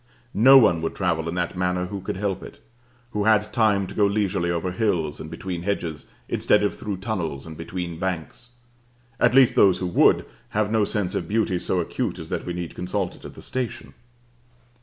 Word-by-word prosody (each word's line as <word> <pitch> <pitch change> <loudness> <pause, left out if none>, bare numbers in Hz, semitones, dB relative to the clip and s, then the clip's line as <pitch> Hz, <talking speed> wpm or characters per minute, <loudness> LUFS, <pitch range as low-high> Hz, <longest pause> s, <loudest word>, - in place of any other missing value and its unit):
No 130 +6 +8
one 85 -10 +5
would 80 - -3
travel 85 -3 0
in 85 - -4
that 90 0 -2
manner 90 0 0
who 95 +1 -6
could 90 - -4
help 95 -1 -2
it - - -11 0.5
who 105 -2 -1
had 110 -1 +3
time 105 -4 +3
to - - -9
go 105 -2 +3
leisurely 100 -3 0
over 85 +1 -1
hills 90 -8 -1
and - - -7
between 90 -3 -5
hedges, 85 -5 -3 0.2
instead 105 0 +2
of 105 - 0
through 100 -3 -4
tunnels 90 -9 -3
and 80 -1 -8
between 85 0 -5
banks: 90 +6 -4 0.7
at - - +3
least 135 -2 +6
those 95 -3 +5
who 90 - -3
would, 90 - +4 0.3
have 105 -1 +1
no 110 -2 +3
sense 100 -3 -1
of 85 - -2
beauty 105 -3 +1
so 90 - 0
acute 85 - -2
as - - -8
that - - -3
we 90 - -2
need 85 -1 -5
consult 90 0 -2
it - - -15
at - - -9
the - - -11
station. 125 -2 -4
95 Hz, 200 wpm, -24 LUFS, 85-105 Hz, 0.7 s, No